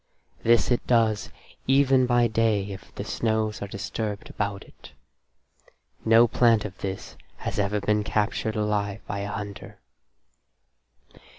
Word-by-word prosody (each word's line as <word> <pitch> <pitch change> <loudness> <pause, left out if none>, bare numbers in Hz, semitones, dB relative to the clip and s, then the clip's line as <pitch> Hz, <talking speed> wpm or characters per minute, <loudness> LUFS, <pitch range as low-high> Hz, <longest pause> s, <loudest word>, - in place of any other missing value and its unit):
This 120 +2 +3
it 120 - 0
does 115 -3 +2 0.4
even 135 -1 +4
by 120 0 +4
day 110 -3 +1
if 95 - -10
the - - -5
snows 110 -2 -1
are 100 - -3
disturbed 100 +1 -5
about 100 -1 -3
it. - - -16 1.1
No 115 +1 +6
plant 115 -3 +3
of 95 -3 -6
this 95 -1 -5 0.2
has - - -4
ever 100 +1 +1
been 105 +1 +1
captured 110 +1 -1
alive 105 -2 -1
by 100 - -4
a 100 - -3
hunter.) 100 -2 -7
105 Hz, 130 wpm, -26 LUFS, 100-115 Hz, 1.1 s, No